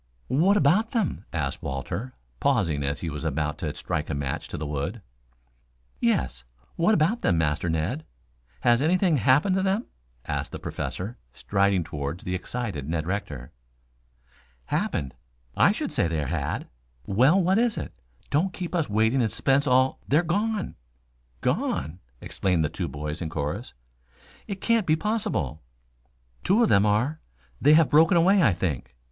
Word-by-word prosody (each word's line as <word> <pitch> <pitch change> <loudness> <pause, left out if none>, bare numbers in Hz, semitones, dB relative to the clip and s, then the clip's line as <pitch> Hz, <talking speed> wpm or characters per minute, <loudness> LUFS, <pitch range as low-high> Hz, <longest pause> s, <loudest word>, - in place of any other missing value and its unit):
"What 175 - +4
about 195 +9 +3
them?" 225 -7 -1
asked - - -2
Walter, 100 - -4 0.2
pausing 75 -4 +1
as 70 +1 -2
he 85 - -3
was 75 +1 -6
about 75 0 -2
to 75 - -2
strike 75 - -3
a 75 - -1
match 70 -2 -3
to - - -6
the 75 - -4
wood. 75 +9 -4 1.0
"Yes, 65 -2 0 0.3
what 175 +3 +3
of 195 +10 +2
them, 85 - +2
Master 80 +1 0
Ned? 85 - -1 0.6
Has 120 +1 +4
anything 175 +1 +3
happened 140 - +3
to - - +1
them?" 195 +4 0 0.4
asked - - -3
the - - -3
Professor, 100 +7 -5 0.2
striding 100 -2 +1
toward 75 0 -5
the 90 - -4
excited 95 - -4
Ned 80 -1 -1
Rector. 75 -9 -4 1.1
"Happened? 65 +1 -2 0.4
I - - +5
should - - -3
say - - +1
there 80 -3 -1
had - - -2 0.2
" - - -40
"Well, 130 - +4
what 190 +3 +3
is 235 -2 +1
it? - - -5 0.4
Don't 175 +6 +1
keep 180 -1 -5
us 165 -7 0
waiting 110 +5 +2
in 115 - +1
suspense 135 +5 +1
all 130 0 +3
" - - -32
"They're 150 +5 +3
gone!" 205 +4 -1 0.6
"Gone?" 80 +6 -1 0.2
exclaimed 90 -5 0
the - - -1
two - - -4
boys 75 +4 -5
in 80 - -3
chorus. 75 -2 -4 0.7
"It 195 -3 -5
can't 230 -4 +2
be 155 - +4
possible." 210 - -2 0.8
"Two 210 +6 +4
of 225 - +3
them 100 +2 +4
are. 120 +10 +1 0.4
They 150 - +6
have 160 -2 +4
broken 165 +4 +6
away, 190 +4 +5
I 125 - +5
think. 85 -9 -3
110 Hz, 165 wpm, -26 LUFS, -, 1.1 s, They